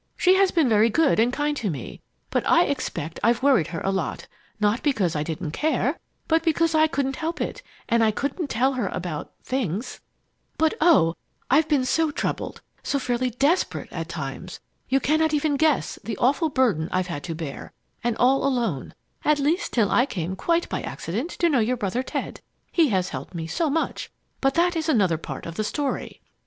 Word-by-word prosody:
She 370 Hz, -, +5 dB
has 385 Hz, 0 st, +4 dB
been 325 Hz, -6 st, +2 dB
very 220 Hz, 0 st, +4 dB
good 285 Hz, +1 st, +3 dB
and 235 Hz, +2 st, +3 dB
kind 295 Hz, +2 st, -1 dB
to 225 Hz, -7 st, -1 dB
me, 140 Hz, -8 st, -6 dB, 0.3 s
but -, -, +1 dB
I -, -, +6 dB
expect 155 Hz, +3 st, -3 dB
I've 235 Hz, +3 st, +2 dB
worried 260 Hz, -, +4 dB
her 165 Hz, -2 st, -5 dB
a 195 Hz, -, 0 dB
lot, 195 Hz, -, -3 dB, 0.3 s
not 210 Hz, +3 st, +2 dB
because 210 Hz, -, +1 dB
I 150 Hz, -, 0 dB
didn't 160 Hz, +1 st, -4 dB
care, 295 Hz, -, 0 dB, 0.3 s
but 325 Hz, 0 st, +3 dB
because 330 Hz, 0 st, +1 dB
I 315 Hz, 0 st, +5 dB
couldn't 270 Hz, -3 st, -2 dB
help 330 Hz, +2 st, -3 dB
it -, -, -3 dB, 0.3 s
and 230 Hz, 0 st, +3 dB
I 220 Hz, -, +4 dB
couldn't 280 Hz, -, -2 dB
tell 260 Hz, +4 st, +2 dB
her 255 Hz, -, -1 dB
about 170 Hz, -4 st, -4 dB
things! 235 Hz, -5 st, -3 dB, 0.6 s
"But, 320 Hz, 0 st, +3 dB
oh! 290 Hz, -, +5 dB, 0.4 s
I 270 Hz, -, +6 dB
have 315 Hz, 0 st, +2 dB
been 280 Hz, -4 st, +2 dB
so 320 Hz, +4 st, +2 dB
troubled 295 Hz, -, -3 dB, 0.2 s
so 280 Hz, -, -1 dB
fairly 255 Hz, -1 st, 0 dB
desperate, 280 Hz, +9 st, 0 dB
at -, -, -5 dB
times! -, -, -6 dB, 0.3 s
You 270 Hz, -, +3 dB
cannot 310 Hz, +3 st, +2 dB
even 295 Hz, 0 st, +1 dB
guess 305 Hz, -1 st, +1 dB
the 220 Hz, -3 st, -4 dB
awful 285 Hz, +6 st, +2 dB
burden 230 Hz, -, +1 dB
I've 185 Hz, 0 st, +1 dB
had 170 Hz, -5 st, -5 dB
to 165 Hz, -2 st, -4 dB
bear 155 Hz, -4 st, -7 dB, 0.3 s
and 235 Hz, -1 st, 0 dB
all 265 Hz, +2 st, +3 dB
alone, 235 Hz, -, -1 dB, 0.3 s
at 300 Hz, 0 st, +3 dB
least 305 Hz, +7 st, 0 dB
till 215 Hz, -5 st, +2 dB
I 245 Hz, -, +4 dB
came 180 Hz, -, -3 dB
quite 335 Hz, -, +1 dB
by -, -, -3 dB
accident 225 Hz, -, -4 dB
to 345 Hz, -, +1 dB
know 285 Hz, -6 st, +3 dB
your 240 Hz, +3 st, +1 dB
brother 205 Hz, +3 st, -1 dB
Ted. -, -, -5 dB, 0.3 s
He 325 Hz, -5 st, +4 dB
has 190 Hz, -3 st, +1 dB
helped -, -, -7 dB
me 165 Hz, -1 st, -3 dB
so 305 Hz, -, -1 dB
much 320 Hz, +3 st, -2 dB, 0.3 s
but 270 Hz, 0 st, +2 dB
that 345 Hz, +1 st, +3 dB
is 320 Hz, 0 st, -1 dB
another 190 Hz, -, +3 dB
part -, -, -7 dB
of 165 Hz, 0 st, -7 dB
the 215 Hz, -, 0 dB
story! 280 Hz, +5 st, -3 dB
255 Hz, 200 wpm, -24 LUFS, 195-310 Hz, 0.6 s, I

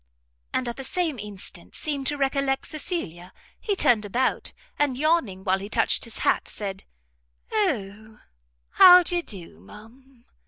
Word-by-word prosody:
and, 255 Hz, -, -1 dB
at 235 Hz, -, -4 dB
the 270 Hz, -, -6 dB
same 315 Hz, -1 st, -1 dB
instant, 205 Hz, -2 st, -8 dB
seeming 290 Hz, -3 st, -2 dB
to 290 Hz, +2 st, 0 dB
recollect 275 Hz, -1 st, 0 dB
Cecilia, 235 Hz, -, -5 dB, 0.3 s
he 410 Hz, -, -1 dB
turned 235 Hz, -, +3 dB
about, 245 Hz, +6 st, -1 dB, 0.3 s
and 285 Hz, -4 st, +1 dB
yawning 285 Hz, -, +1 dB
while 190 Hz, -1 st, +1 dB
he 200 Hz, +2 st, -7 dB
touched -, -, +1 dB
his 230 Hz, -, -7 dB
hat, -, -, +2 dB
said, 195 Hz, -2 st, -5 dB, 0.7 s
"O, 220 Hz, -, -2 dB, 0.5 s
how 360 Hz, 0 st, +9 dB
d'ye 350 Hz, 0 st, +1 dB
do, 180 Hz, -, -8 dB
ma'am?" 235 Hz, -, -17 dB
255 Hz, 145 wpm, -25 LUFS, 205-295 Hz, 0.7 s, how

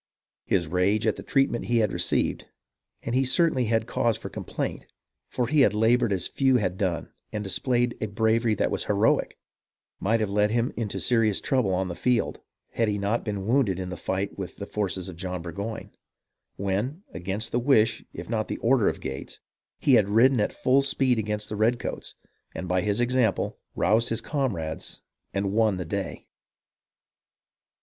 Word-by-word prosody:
His 85 Hz, -4 st, +1 dB
rage 95 Hz, +6 st, +1 dB
at 110 Hz, -, +2 dB
the -, -, -8 dB
treatment 135 Hz, -4 st, +1 dB
he 120 Hz, -, +1 dB
had 105 Hz, -4 st, +2 dB
received -, -, 0 dB, 0.3 s
— -, -, -47 dB
and 115 Hz, -, -3 dB
he 130 Hz, +2 st, +3 dB
certainly 135 Hz, -1 st, +2 dB
had 115 Hz, 0 st, +1 dB
cause 115 Hz, -2 st, 0 dB
for -, -, -7 dB
complaint, -, -, -4 dB, 0.4 s
for 125 Hz, -, -1 dB
he 150 Hz, +3 st, +3 dB
had 105 Hz, -6 st, +4 dB
laboured 115 Hz, +1 st, +3 dB
as 95 Hz, -3 st, 0 dB
few 135 Hz, -2 st, +2 dB
had 90 Hz, -5 st, -1 dB
done 90 Hz, -4 st, -2 dB, 0.2 s
and 105 Hz, -, -3 dB
displayed 120 Hz, +4 st, 0 dB
a 110 Hz, -, 0 dB
bravery 110 Hz, +2 st, +2 dB
that -, -, 0 dB
was -, -, -2 dB
heroic -, -, +2 dB, 0.3 s
— -, -, -68 dB
might 115 Hz, +4 st, +1 dB
have 110 Hz, -2 st, 0 dB
led 105 Hz, +1 st, +3 dB
him 115 Hz, +2 st, 0 dB
into 110 Hz, -4 st, -3 dB
serious 115 Hz, -4 st, +2 dB
trouble 130 Hz, -8 st, +1 dB
on 95 Hz, +1 st, 0 dB
the 90 Hz, -, -4 dB
field, 125 Hz, +6 st, 0 dB, 0.3 s
had 115 Hz, -, +1 dB
he 105 Hz, -1 st, 0 dB
not 100 Hz, +4 st, 0 dB
been 100 Hz, -3 st, -3 dB
wounded 115 Hz, -5 st, +2 dB
in 95 Hz, -1 st, -4 dB
the 90 Hz, -, -4 dB
fight 95 Hz, +4 st, -3 dB
with 95 Hz, -, -5 dB
the 100 Hz, -, -6 dB
forces 95 Hz, -4 st, -3 dB
of 90 Hz, -3 st, -8 dB
John 90 Hz, -1 st, -4 dB
Burgoyne, 100 Hz, +5 st, -5 dB, 0.6 s
when, 105 Hz, -, -2 dB
against 95 Hz, +6 st, -3 dB
the 120 Hz, -, +1 dB
wish 115 Hz, -4 st, +3 dB
if -, -, -8 dB
not 110 Hz, -1 st, -1 dB
the -, -, -3 dB
order 120 Hz, -2 st, +3 dB
of -, -, -5 dB
Gates, 65 Hz, 0 st, -6 dB, 0.4 s
he 135 Hz, -, +3 dB
had 105 Hz, -5 st, +5 dB
ridden 120 Hz, +4 st, +5 dB
at 105 Hz, -, +1 dB
full 130 Hz, +2 st, +3 dB
speed 135 Hz, -3 st, +1 dB
against 105 Hz, 0 st, -3 dB
the 105 Hz, -, -5 dB
redcoats, 115 Hz, +3 st, -1 dB, 0.4 s
and, 90 Hz, -, -5 dB
by 90 Hz, +1 st, +1 dB
his 105 Hz, +4 st, 0 dB
example, 120 Hz, -4 st, +1 dB, 0.2 s
roused 115 Hz, +2 st, +2 dB
his 115 Hz, 0 st, -1 dB
comrades 105 Hz, -, -3 dB, 0.3 s
and 100 Hz, 0 st, -1 dB
won 110 Hz, -3 st, +3 dB
the 90 Hz, -, -4 dB
day. 95 Hz, -3 st, -4 dB
110 Hz, 185 wpm, -26 LUFS, 95-120 Hz, 0.6 s, had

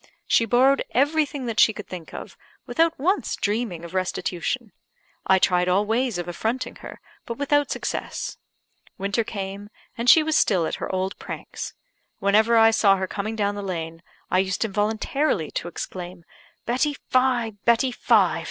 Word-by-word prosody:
She 230 Hz, -, +3 dB
borrowed 255 Hz, +5 st, +4 dB
everything 290 Hz, 0 st, +1 dB
that 230 Hz, -2 st, -2 dB
she 220 Hz, -, +6 dB
could 210 Hz, -, -8 dB
think 175 Hz, -3 st, -8 dB
of, -, -, -8 dB, 0.3 s
without 330 Hz, 0 st, +1 dB
once 365 Hz, +9 st, 0 dB
dreaming 205 Hz, -5 st, -2 dB
of 170 Hz, -, -10 dB
restitution. 185 Hz, +4 st, -2 dB, 0.6 s
I 190 Hz, -, +6 dB
tried 180 Hz, -1 st, +2 dB
all 195 Hz, +3 st, +3 dB
ways 230 Hz, 0 st, 0 dB
of 175 Hz, 0 st, -4 dB
affronting 220 Hz, +8 st, -3 dB
her, -, -, -10 dB, 0.3 s
but 235 Hz, -, -4 dB
without 290 Hz, +1 st, +1 dB
success. -, -, -4 dB, 0.6 s
Winter 200 Hz, +4 st, 0 dB
came, 200 Hz, -1 st, -6 dB, 0.3 s
and 240 Hz, 0 st, +1 dB
she 315 Hz, -, +8 dB
was 315 Hz, 0 st, 0 dB
still 185 Hz, -, +3 dB
at -, -, -3 dB
her -, -, -3 dB
old 190 Hz, +1 st, -2 dB
pranks. -, -, -7 dB, 0.4 s
Whenever 220 Hz, +4 st, +3 dB
I 225 Hz, 0 st, +7 dB
saw 200 Hz, -3 st, +4 dB
her 190 Hz, -, -1 dB
coming 215 Hz, +3 st, -4 dB
down 205 Hz, -2 st, 0 dB
the 205 Hz, -, -5 dB
lane, 165 Hz, -4 st, -5 dB, 0.3 s
I 185 Hz, -, +4 dB
used 190 Hz, +3 st, 0 dB
involuntarily 215 Hz, -, 0 dB
to -, -, -4 dB
exclaim, 175 Hz, 0 st, -7 dB, 0.4 s
"Betty 260 Hz, +5 st, 0 dB, 0.2 s
Fye! 255 Hz, -3 st, +2 dB
Betty 235 Hz, +3 st, +3 dB
Fye! -, -, +3 dB
215 Hz, 160 wpm, -24 LUFS, 190-255 Hz, 0.6 s, she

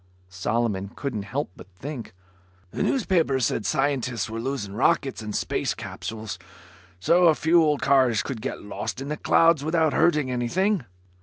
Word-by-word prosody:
Solomon 100 Hz, +2 st, -1 dB
couldn't 130 Hz, -7 st, -3 dB
help 140 Hz, -6 st, -2 dB
but -, -, -13 dB
think, 125 Hz, -2 st, -7 dB, 0.6 s
"The -, -, -4 dB
newspapers 165 Hz, -, +2 dB
said 105 Hz, -, -1 dB
scientists 130 Hz, -6 st, 0 dB
were 115 Hz, -, -4 dB
losing 120 Hz, -5 st, -3 dB
rockets 135 Hz, +2 st, +1 dB
and 105 Hz, -1 st, -5 dB
space -, -, -1 dB
capsules, 110 Hz, -3 st, -6 dB, 0.6 s
so 175 Hz, -, +4 dB
a 160 Hz, -, +5 dB
few 165 Hz, +3 st, +4 dB
old 150 Hz, -3 st, +1 dB
cars 130 Hz, -5 st, +3 dB
could 125 Hz, -6 st, -5 dB
get 135 Hz, -, -5 dB
lost 105 Hz, +4 st, -5 dB
in 135 Hz, +1 st, -5 dB
the 150 Hz, -, -2 dB
clouds 165 Hz, -3 st, +4 dB
without 160 Hz, -1 st, +2 dB
hurting 150 Hz, -6 st, +2 dB
anything." 165 Hz, -, 0 dB
135 Hz, 155 wpm, -25 LUFS, 115-155 Hz, 0.6 s, a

